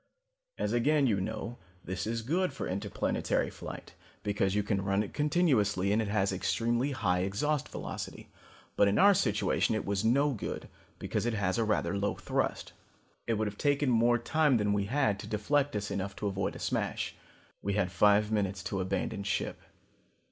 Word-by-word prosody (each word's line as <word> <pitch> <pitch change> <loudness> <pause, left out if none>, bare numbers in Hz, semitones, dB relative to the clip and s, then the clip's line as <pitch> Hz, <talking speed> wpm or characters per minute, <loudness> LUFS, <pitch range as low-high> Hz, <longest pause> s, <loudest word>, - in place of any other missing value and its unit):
As - - -1
again 140 +4 +3
you 105 -6 +2
know, 110 +4 -4 0.3
this 95 +2 -3
is 115 0 -2
good 180 +9 0
for - - -4
interplanetary 95 +2 -1
flight - - -9 0.3
because 100 -1 0
you 105 - +2
can 100 -1 0
run 100 +1 +1
it 100 - -8
continuously 125 - +2
and 110 - +2
it 110 - -2
has 100 -1 +1
extremely 120 +7 0
high 95 -10 0
exhaust 120 +11 -1
velocity. - - -6 0.5
But 100 - +5
in 100 - +2
our 200 +1 +7
situation 105 - +1
it 110 - -2
was 100 +1 -1
no 140 +6 +3
good 110 - -5 0.3
because - - -2
it 120 - 0
has 100 0 0
rather 110 -2 +1
a 100 - -1
low 100 +1 0
thrust. - - -2 0.5
It 115 - +2
would 110 +1 0
have 105 0 -5
taken 145 -2 +2
more 120 +1 +4
time 150 0 +2
than 105 -1 +1
we 100 -1 +1
had 125 -3 +1
to - - -7
deflect 140 +7 0
us 105 -1 -2
enough 100 0 -3
to - - -5
avoid 95 -1 -1
a - - -6
smash. - - -2 0.5
We 100 - -1
had 100 -3 0
five 105 +3 +4
minutes 100 -3 -1
to 100 -1 -2
abandon 100 +2 -2
ship. 100 -1 -2
105 Hz, 185 wpm, -30 LUFS, 100-120 Hz, 0.5 s, our